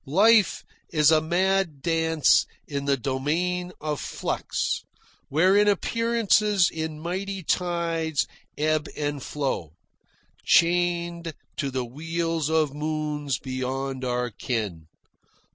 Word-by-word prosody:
Life 205 Hz, +7 st, +4 dB, 0.3 s
is 150 Hz, -1 st, +4 dB
a 155 Hz, -1 st, +5 dB
mad 175 Hz, -2 st, +1 dB
dance 160 Hz, -3 st, +3 dB, 0.2 s
in 140 Hz, -1 st, -3 dB
the 140 Hz, -1 st, +2 dB
domain 165 Hz, +8 st, -1 dB
of 150 Hz, -2 st, -3 dB
flux, -, -, -2 dB, 0.5 s
wherein 190 Hz, +7 st, +4 dB
appearances 210 Hz, -2 st, +2 dB
in 160 Hz, -1 st, -4 dB
mighty 190 Hz, +3 st, -4 dB
tides 165 Hz, -3 st, 0 dB, 0.3 s
ebb 155 Hz, +1 st, +1 dB
and 145 Hz, -1 st, -2 dB
flow, 130 Hz, -, -3 dB, 0.7 s
chained 170 Hz, -1 st, +2 dB, 0.2 s
to 140 Hz, -, -1 dB
the 130 Hz, -1 st, -2 dB
wheels 165 Hz, +4 st, -2 dB
of 155 Hz, -3 st, +2 dB
moons 150 Hz, -2 st, -2 dB
beyond 130 Hz, +1 st, -3 dB
our 125 Hz, -1 st, -1 dB
ken. 105 Hz, -9 st, -3 dB
160 Hz, 105 wpm, -25 LUFS, 140-175 Hz, 0.7 s, a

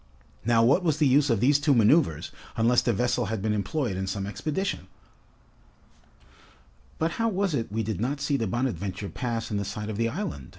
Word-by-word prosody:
Now, 115 Hz, 0 st, +3 dB
what 135 Hz, +10 st, +4 dB
was 155 Hz, -4 st, +1 dB
the 155 Hz, -, +3 dB
use 140 Hz, +2 st, +4 dB
of 115 Hz, -4 st, +1 dB
these 140 Hz, +3 st, +4 dB
two 145 Hz, -1 st, +3 dB
maneuvers, 115 Hz, -, +3 dB, 0.3 s
unless 120 Hz, +2 st, +4 dB
the 120 Hz, -, +1 dB
vessel 120 Hz, +2 st, 0 dB
had 110 Hz, +1 st, -2 dB
been 110 Hz, -1 st, +1 dB
employed 110 Hz, -, -1 dB
in 95 Hz, 0 st, -3 dB
some 100 Hz, 0 st, -3 dB
expedition? 150 Hz, -, -3 dB, 2.1 s
"But 165 Hz, +1 st, 0 dB
how 230 Hz, -, +2 dB
was 195 Hz, -3 st, 0 dB
it 115 Hz, -7 st, -2 dB
we 110 Hz, +1 st, -1 dB
did 110 Hz, -3 st, -3 dB
not 140 Hz, +5 st, -1 dB
see 140 Hz, 0 st, 0 dB
the 115 Hz, -5 st, -1 dB
'Bonadventure' 100 Hz, -3 st, -2 dB
pass 115 Hz, -3 st, -3 dB
in 105 Hz, -, 0 dB
the 100 Hz, -, -1 dB
sight 105 Hz, +2 st, -5 dB
of 105 Hz, -, -5 dB
the 115 Hz, 0 st, +1 dB
island?" 155 Hz, -, -5 dB
120 Hz, 200 wpm, -26 LUFS, 105-145 Hz, 2.1 s, what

